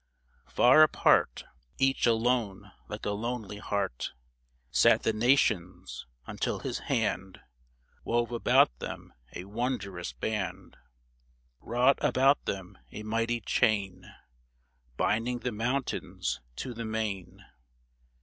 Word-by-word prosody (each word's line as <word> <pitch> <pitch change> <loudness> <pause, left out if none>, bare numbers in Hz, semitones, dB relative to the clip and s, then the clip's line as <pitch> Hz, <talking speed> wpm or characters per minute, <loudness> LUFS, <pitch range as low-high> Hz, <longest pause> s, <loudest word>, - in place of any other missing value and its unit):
Far 130 +5 +6
apart 150 - +4 0.2
— - - -39
Each 135 -2 +1
alone 115 -3 0 0.2
like - - -7
a 105 - 0
lonely 105 -1 -4
heart 100 - -3 0.3
— - - -42 0.3
Sat 70 -2 +4
the 110 - +1
Nations, 110 -6 +1 0.2
until - - -2
his - - -4
hand 95 0 -2 0.6
Wove 120 0 0
about 115 - +3
them - - -7 0.2
a 90 - -5
wondrous 100 - -3
band; 100 - -4 0.8
Wrought 125 +4 +2
about 135 +3 +3
them 95 0 -5
a 105 - -7
mighty 115 +2 -1
chain 100 -6 0 0.9
Binding 120 +3 0
the 125 - -2
mountains 125 +5 -2
to 125 - -5
the 115 0 -5
main 110 -4 -4
110 Hz, 110 wpm, -29 LUFS, 95-120 Hz, 0.9 s, Far